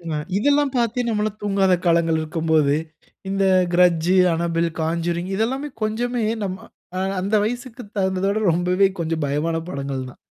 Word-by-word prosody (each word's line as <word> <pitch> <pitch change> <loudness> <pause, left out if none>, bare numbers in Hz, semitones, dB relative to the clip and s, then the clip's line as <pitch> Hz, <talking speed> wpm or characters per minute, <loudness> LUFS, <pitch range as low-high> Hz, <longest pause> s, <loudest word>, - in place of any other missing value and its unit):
அ - - -1 0.2
இதெல்லாம் 285 +3 +2
பாத்து 240 0 +1
நம்மலாம் 215 -1 -1
தூங்காத 195 -2 +2
காலங்கள் 165 -1 +3
இருக்கும் 160 +1 -4
போது, 150 -3 +4 0.5
இந்த 195 0 +1 0.3
கிரட்ஜ், 175 -1 +3 0.2
அனபெல், 170 0 0
கான்ஜூரிங். 170 +2 -1
இதெல்லாமே 265 +7 -1
கொஞ்சமே 235 +2 -1 0.2
நம்ம, 190 -1 -3 0.4
அ - - 0 0.2
அந்த 200 +3 0
வயசுக்கு 245 +1 -5 0.2
தகுந்தத 190 -1 0
விட 205 +2 0
ரொம்பவே 180 +3 +3
கொஞ்சம் 160 -2 -1
பயமான 150 +4 -1
படங்கள் 140 -3 -4
தான். - - -15
185 Hz, 145 wpm, -22 LUFS, 165-215 Hz, 0.5 s, போது